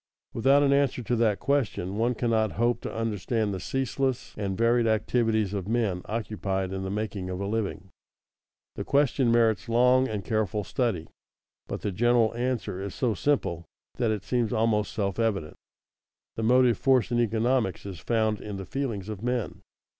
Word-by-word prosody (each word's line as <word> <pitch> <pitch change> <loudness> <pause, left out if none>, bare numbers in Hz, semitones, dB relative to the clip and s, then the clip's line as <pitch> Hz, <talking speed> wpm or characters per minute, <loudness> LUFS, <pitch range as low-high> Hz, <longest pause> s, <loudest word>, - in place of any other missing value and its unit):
Without 135 +5 +4
an 140 -1 +4
answer 140 -3 +1
to 120 - 0
that 110 -3 +2
question 120 -9 -1
one 120 +3 +1
cannot 110 -2 +1
hope 120 +1 +1
to - - -5
understand 110 -1 -1
the 95 - -4
ceaseless 135 +3 -2
and 100 -2 -3
varied 115 +1 +3
activities 110 -2 +1
of 100 -2 -3
men 110 -5 0
occupied 100 -4 -3
in 95 - -3
the 95 - -3
making 100 -2 -3
of 90 0 -4
a 100 - -2
living. 105 -2 -3 0.9
The - - -4
question 140 -3 +2
merits 115 0 +2
long 125 +2 +4
and 105 -4 -4
careful 110 -1 -1
study, 110 -8 -1 0.6
but - - -5
the 105 - -2
general 120 +3 +3
answer 120 -5 -2
is 100 -1 -5
so 120 -4 +1
simple 90 - 0 0.3
that 120 -3 +2
it 105 -2 -1
seems 115 0 0
almost 110 -2 +1
self 100 -2 -2
evident: 100 -9 -1 0.8
The - - -3
motive 125 0 +4
force 130 -3 +3
in 120 - +2
economics 115 -3 +1
is 95 -4 -7
found 110 -1 0
in 105 -2 -6
the 95 - -6
feelings 115 -8 -3
of 105 -3 -6
men. 125 -2 -2
110 Hz, 170 wpm, -27 LUFS, 100-120 Hz, 0.9 s, Without